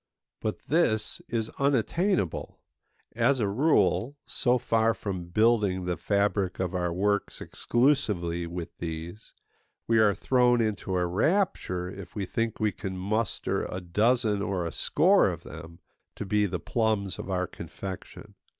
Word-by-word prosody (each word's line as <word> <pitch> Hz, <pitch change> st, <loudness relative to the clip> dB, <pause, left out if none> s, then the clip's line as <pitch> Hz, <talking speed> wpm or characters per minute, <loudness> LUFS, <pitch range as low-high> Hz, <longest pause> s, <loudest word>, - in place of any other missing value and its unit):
But 110 Hz, -, -3 dB
this 110 Hz, -10 st, +1 dB
is 115 Hz, -1 st, -2 dB
unattainable. 140 Hz, -, 0 dB, 0.6 s
As 125 Hz, +4 st, +3 dB
a 105 Hz, -, +1 dB
rule, 115 Hz, -, +2 dB
so 125 Hz, 0 st, +1 dB
far 115 Hz, -1 st, +2 dB
from 95 Hz, -6 st, -4 dB
building 100 Hz, -1 st, +2 dB
the 90 Hz, -1 st, -1 dB
fabric 100 Hz, +1 st, 0 dB
of 95 Hz, -1 st, -1 dB
our 90 Hz, -1 st, -1 dB
works 100 Hz, +3 st, 0 dB
exclusively 105 Hz, -, 0 dB
with 85 Hz, 0 st, -6 dB
these, 85 Hz, +4 st, -6 dB, 0.5 s
we 115 Hz, -1 st, +3 dB
are 105 Hz, -3 st, +4 dB
thrown 125 Hz, +2 st, +3 dB
into 105 Hz, -4 st, -1 dB
a 90 Hz, -1 st, +2 dB
rapture 95 Hz, -, 0 dB
if 90 Hz, -, -9 dB
we 100 Hz, -3 st, -2 dB
think 115 Hz, +4 st, -2 dB
we 110 Hz, -1 st, +2 dB
can 95 Hz, 0 st, -6 dB
muster 105 Hz, +3 st, -1 dB
a 90 Hz, -, -4 dB
dozen 105 Hz, +4 st, +1 dB
or 95 Hz, -4 st, -1 dB
a 85 Hz, -, -4 dB
score -, -, +4 dB
of -, -, -6 dB
them, 85 Hz, +1 st, -10 dB, 0.4 s
to -, -, -5 dB
be 105 Hz, +1 st, +2 dB
the 90 Hz, -1 st, -3 dB
plums 110 Hz, 0 st, -1 dB
of -, -, -6 dB
our 90 Hz, -1 st, 0 dB
confection. 95 Hz, +1 st, -8 dB
105 Hz, 145 wpm, -28 LUFS, 90-115 Hz, 0.6 s, are